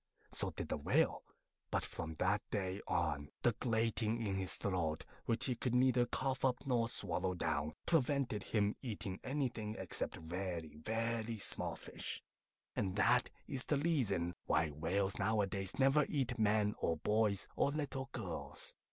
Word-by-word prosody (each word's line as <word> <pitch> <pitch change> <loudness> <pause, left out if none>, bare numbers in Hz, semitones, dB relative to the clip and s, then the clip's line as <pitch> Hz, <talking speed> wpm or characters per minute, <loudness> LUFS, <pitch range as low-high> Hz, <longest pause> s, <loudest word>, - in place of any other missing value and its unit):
So - - +4
did - - -5
the - - 0
Whale. - - +2 0.5
But - - +1
from 80 -1 -5
that 100 +5 +2
day 95 -2 -1
on, 70 +1 0
the 120 - +6
grating 115 -1 +1
in 100 - 0
his 95 -1 -2
throat, 85 -5 -1 0.2
which 115 - +1
he 130 - +1
could 125 +1 0
neither 125 -1 +5
cough 135 0 -1
up 125 -2 +2
nor 120 -3 +2
swallow 90 -4 0
down, 75 -2 -1
prevented 140 -8 +2
him 105 -1 +2
eating 100 -6 -4
anything 125 -6 -1
except 95 -3 -3
very, 85 0 -4
very 115 +5 -1
small 100 - -1
fish; - - -6 0.5
and 95 -2 0
that 105 - +4 0.2
is 130 -1 -3
the 150 - +2
reason 115 - +1
why 80 +1 +3
whales 90 +7 0
nowadays 100 -2 0
never 135 +2 +5
eat 125 -4 0
men 105 -1 +3
or 80 - +1
boys 105 +3 +2
or - - +3
little 140 -2 -2
girls. 95 -8 -4
105 Hz, 150 wpm, -37 LUFS, 95-125 Hz, 0.5 s, the